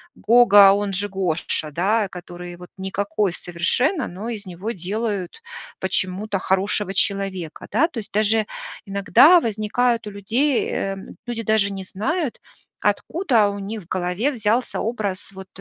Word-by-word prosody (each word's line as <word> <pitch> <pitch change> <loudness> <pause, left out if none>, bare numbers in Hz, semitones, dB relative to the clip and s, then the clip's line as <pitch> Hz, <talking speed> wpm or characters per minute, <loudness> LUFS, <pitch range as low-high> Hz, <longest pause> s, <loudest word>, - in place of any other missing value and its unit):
Гога, 205 -4 +7
он 205 -1 -1
же 205 +2 -1
Гоша, 175 -4 -1
да, 200 +7 +1
который 175 0 -9
вот, 180 0 -12
никакой 200 0 -1
совершенно, 245 - 0
но 195 +6 -6
из 215 -4 -5
него 185 +4 -6
делают 200 - -3 0.4
почему-то 190 +2 -1
хорошего 195 +1 0
человека. 195 -4 -2
Да, 280 +11 +3
то 265 - -11
есть, 205 - -9
даже 215 +1 +2 0.4
иногда 200 - +6
возникают 230 +1 0
у 210 - -5
людей, 235 +8 0
эм, 195 0 -4
люди 240 -1 -3
даже 215 -2 +2
не 195 -1 -5
знают, 260 - -2 0.4
откуда 245 - +2
у 200 - -5
них 210 +2 -5
в - - -23
голове 185 +9 0
взялся 230 0 0
образ 210 -5 -3
вот, 190 -1 -10
200 Hz, 140 wpm, -22 LUFS, 190-225 Hz, 0.4 s, Гога